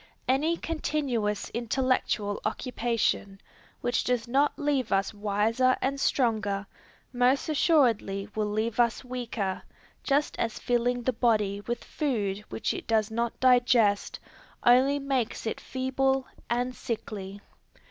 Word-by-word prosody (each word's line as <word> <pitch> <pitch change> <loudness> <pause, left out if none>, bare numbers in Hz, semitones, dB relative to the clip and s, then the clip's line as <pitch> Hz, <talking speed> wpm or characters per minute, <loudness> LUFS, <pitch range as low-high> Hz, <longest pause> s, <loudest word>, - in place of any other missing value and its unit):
Any 305 +6 +2
continuous 265 -11 -2
intellectual 235 -3 0
occupation, 225 -4 -1 0.4
which 245 -1 0
does 245 -2 0
not 275 +4 +2
leave 290 -3 0
us 195 +2 +1
wiser 215 +5 +1
and 275 +1 -1
stronger, 215 -7 +1 0.5
most 250 +2 +2
assuredly 245 - +2
will 215 -1 -1
leave 220 +2 -1
us 235 +2 +2
weaker, 235 -6 -3 0.4
just 285 +1 +1
as 225 -1 -1
filling 245 0 0
the 255 - +1
body 210 -4 +1
with 240 0 -3
food 210 -10 -2
which - - -2
it - - -7
does 220 -1 +1
not 235 +1 -2
digest, 245 -5 +3 0.4
only 260 +4 +5
makes 270 -6 -2
it 220 - -3
feeble 265 0 0 0.2
and 245 +1 0
sickly. 205 -4 -5
240 Hz, 120 wpm, -28 LUFS, 215-260 Hz, 0.5 s, only